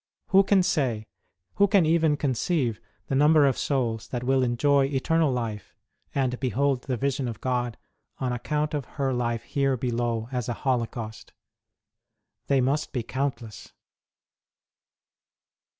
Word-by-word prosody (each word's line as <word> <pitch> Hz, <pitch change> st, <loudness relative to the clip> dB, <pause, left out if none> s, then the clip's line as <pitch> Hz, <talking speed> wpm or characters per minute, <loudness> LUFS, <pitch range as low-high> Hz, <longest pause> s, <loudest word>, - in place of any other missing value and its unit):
Who 195 Hz, 0 st, +7 dB
can 195 Hz, -1 st, +3 dB
say, 130 Hz, -, 0 dB, 0.5 s
who 200 Hz, 0 st, +5 dB
can 195 Hz, -4 st, +4 dB
even 160 Hz, -2 st, +3 dB
con 140 Hz, -3 st, 0 dB
ceive, 125 Hz, -, 0 dB, 0.3 s
the -, -, -4 dB
number 150 Hz, +2 st, +5 dB
of 135 Hz, -3 st, +3 dB
souls 120 Hz, -6 st, -1 dB
that 125 Hz, -1 st, -4 dB
will 130 Hz, +1 st, +2 dB
enjoy 135 Hz, +3 st, +3 dB
eternal 145 Hz, +3 st, +1 dB
life, 115 Hz, -5 st, -4 dB, 0.4 s
and 130 Hz, -2 st, 0 dB
behold 135 Hz, 0 st, 0 dB
the 130 Hz, -3 st, -1 dB
vision 135 Hz, 0 st, -1 dB
of 115 Hz, -2 st, -5 dB
God, 125 Hz, -2 st, -1 dB, 0.4 s
on 125 Hz, -2 st, -2 dB
account 150 Hz, +5 st, -2 dB
of 145 Hz, -4 st, -2 dB
her 135 Hz, -2 st, 0 dB
life 120 Hz, -2 st, -1 dB
here 135 Hz, 0 st, 0 dB
below 120 Hz, -2 st, -1 dB
as 125 Hz, -2 st, -2 dB
a -, -, 0 dB
holocaust? 115 Hz, -3 st, -2 dB, 1.1 s
They 135 Hz, -2 st, +3 dB
must 140 Hz, +5 st, 0 dB
be 125 Hz, -4 st, -1 dB
countless. 120 Hz, -4 st, -4 dB
130 Hz, 140 wpm, -26 LUFS, 120-145 Hz, 1.1 s, Who